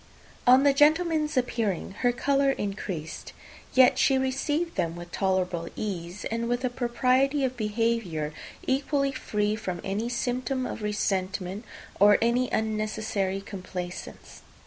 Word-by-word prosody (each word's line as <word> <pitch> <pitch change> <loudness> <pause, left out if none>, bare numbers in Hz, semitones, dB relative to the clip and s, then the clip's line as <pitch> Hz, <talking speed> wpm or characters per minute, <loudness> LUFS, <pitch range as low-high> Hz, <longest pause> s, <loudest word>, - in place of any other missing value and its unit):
On 255 +2 +7
the 285 -1 +5
gentlemen's 310 0 +3
appearing, 225 -8 -1
her 245 - +3
colour 275 +2 +2
increased; 195 - -5 0.4
yet 255 -1 +6
she 270 - +4
received 290 +6 -1
them 165 0 -1
with 175 0 -9
tolerable 185 -3 0
ease, 180 -2 -5
and 230 +1 -1
with 245 +1 0
a 250 - 0
propriety 255 +3 +1
of 255 0 -2
behaviour 210 -9 -1 0.3
equally 275 +1 +1
free 210 -4 -1
from 185 -5 -4
any 210 +5 -2
symptom 255 +2 -1
of - - -5
resentment, 195 -1 -2 0.3
or 205 +1 +7
any 240 +2 +2
unnecessary 215 -3 -1
complaisance. 185 -2 -7
225 Hz, 125 wpm, -27 LUFS, 195-260 Hz, 0.4 s, On